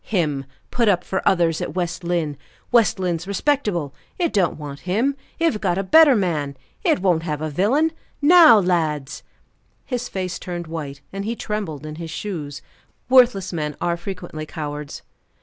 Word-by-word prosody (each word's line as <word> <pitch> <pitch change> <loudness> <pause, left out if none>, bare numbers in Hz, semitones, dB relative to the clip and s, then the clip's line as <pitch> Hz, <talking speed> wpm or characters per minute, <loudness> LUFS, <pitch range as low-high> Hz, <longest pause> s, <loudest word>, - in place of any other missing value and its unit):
Him 150 -9 -1 0.3
put 235 -2 +1
up 180 -3 +2
for 190 - -2
others 170 -3 +1
at - - -4
West 175 -1 -2
Lynne! 170 -4 -1 0.4
West 230 -6 +4
Lynne's 175 -2 -2
respectable, 200 - 0 0.2
it 345 -3 0
don't 190 -5 +1
want 145 -2 -7
him; 245 +9 +1 0.2
it 335 0 +3
have 210 - -6
got 175 - +1
a 195 - 0
better 300 +6 +7
man; 155 - -1 0.3
it - - +2
won't 175 -4 +3
have 155 -3 -3
a 155 0 -3
villain. 255 - +2 0.3
Now, 315 -5 +8
lads!" 160 -7 0 0.6
His 245 -2 -3
face 185 -1 -4
turned 175 -2 -5
white, 150 -4 -6
and 195 0 -4
he 225 +3 -2
trembled 200 -11 -4
in 155 0 -7
his 165 -1 -6
shoes 155 -5 -5 0.5
worthless 240 -8 +4
men 150 -3 -3
are 170 0 0
frequently 170 -4 -7
cowards. 150 -2 -6
175 Hz, 165 wpm, -22 LUFS, 155-210 Hz, 0.6 s, Now